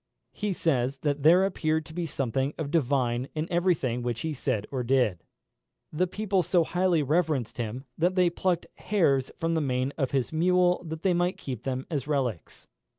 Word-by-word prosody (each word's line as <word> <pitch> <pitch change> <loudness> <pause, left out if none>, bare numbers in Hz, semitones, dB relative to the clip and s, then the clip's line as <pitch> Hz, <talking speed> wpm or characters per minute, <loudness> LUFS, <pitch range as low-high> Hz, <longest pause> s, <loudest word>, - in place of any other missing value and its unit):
He 210 -1 -3
says, 135 -7 0
that 145 -1 0
there 175 +6 +6
appeared 160 -4 0
to 160 - -12
be 170 0 -2
something 135 0 -1
of 150 -3 -4
divine 130 -5 +1
in 155 0 -1
every 175 +1 +3
thing 125 -4 -2
which 120 -1 -3
he 160 -1 -2
said 125 -6 -1
or 130 -2 -2
did. 120 - +1 0.7
The 180 +4 +1
people 200 0 0
so 175 +1 +2
highly 175 -2 +1
reverenced 150 -5 0
him, 120 +4 -4
that 180 +3 +2
they 180 -2 +3
plucked 175 0 0
hairs 140 -10 +1
from 165 0 -1
the 160 - +1
mane 130 0 -1
of 135 -3 +1
his 135 +1 -1
mule 180 +2 +3
that 160 0 -6
they 190 - +3
might 175 +2 0
keep 125 -4 -6
them 130 0 -2
as 145 -3 -2
relics. 130 - -2
150 Hz, 190 wpm, -27 LUFS, 130-175 Hz, 0.7 s, there